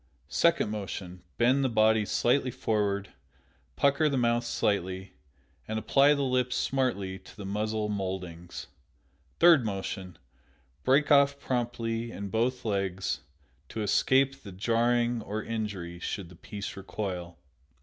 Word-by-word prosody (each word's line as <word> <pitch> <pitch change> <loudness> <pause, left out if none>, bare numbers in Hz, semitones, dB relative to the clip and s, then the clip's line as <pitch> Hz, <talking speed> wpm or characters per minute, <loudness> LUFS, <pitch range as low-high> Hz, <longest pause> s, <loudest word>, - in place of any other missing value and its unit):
Second 170 -10 +2
motion: 95 -3 -5 0.2
Bend 130 +4 +3
the 130 - +2
body 110 -1 +4
slightly 125 +5 +2
forward, 105 -5 -1 0.6
pucker 140 +2 +3
the 140 - 0
mouth 120 -1 +2
slightly, 95 -4 -1 0.5
and 110 - -2
apply 140 +6 +4
the 140 - -1
lips 125 -1 +1
smartly 100 -8 -1
to - - -16
the 100 - -7
muzzle 105 +2 -1
mouldings. 95 -4 -5 0.7
Third 165 -6 +7
motion: 95 -3 -4 0.7
Break 140 +3 +3
off 140 -1 +5
promptly 115 -2 -2
in 100 -2 -6
both 120 +5 0
legs 95 -3 -1 0.5
to 110 - -3
escape 135 +6 +3
the 100 - -9
jarring 120 +4 +1
or 105 +1 -4
injury 100 -6 -4
should 90 0 -4
the 90 - -13
piece 100 +3 -7
recoil. 95 -3 -5
110 Hz, 130 wpm, -29 LUFS, 95-125 Hz, 0.7 s, Third